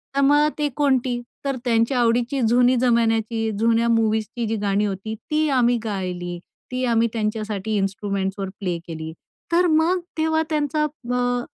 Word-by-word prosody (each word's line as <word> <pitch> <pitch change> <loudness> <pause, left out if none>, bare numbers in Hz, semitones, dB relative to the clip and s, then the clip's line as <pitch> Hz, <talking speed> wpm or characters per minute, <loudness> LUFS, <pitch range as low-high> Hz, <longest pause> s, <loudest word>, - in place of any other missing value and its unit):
तर 280 - +3
मग 290 +2 +5
ते 300 -1 +1
कोणती? 260 -4 +1 0.3
तर 275 -1 0
त्यांच्या 230 +2 +2
आवडीची 240 +3 +1
जुनी 245 +2 +4
जमान्याची 225 -2 +1
जुन्या 230 +1 +3
मूव्हीजची 225 +1 0
जी 225 - -1
गाणी 200 +1 +1
होती, 205 +2 -4
ती 305 +7 -1
आम्ही 245 -3 +3
गायली. 180 -4 -4 0.3
ती 255 0 -2
आम्ही 230 -1 +3
त्यांच्यासाठी 215 -1 -2
इन्स्ट्रुमेंट्सवर 195 0 -2
प्ले 180 -4 -2
केली. 160 -1 -6 0.4
तर 350 +1 +4
मग 325 +4 +3 0.2
तेव्हा 320 0 +2
त्यांचा 300 -1 0 0.3
अ, 245 0 0
230 Hz, 145 wpm, -22 LUFS, 210-260 Hz, 0.4 s, मग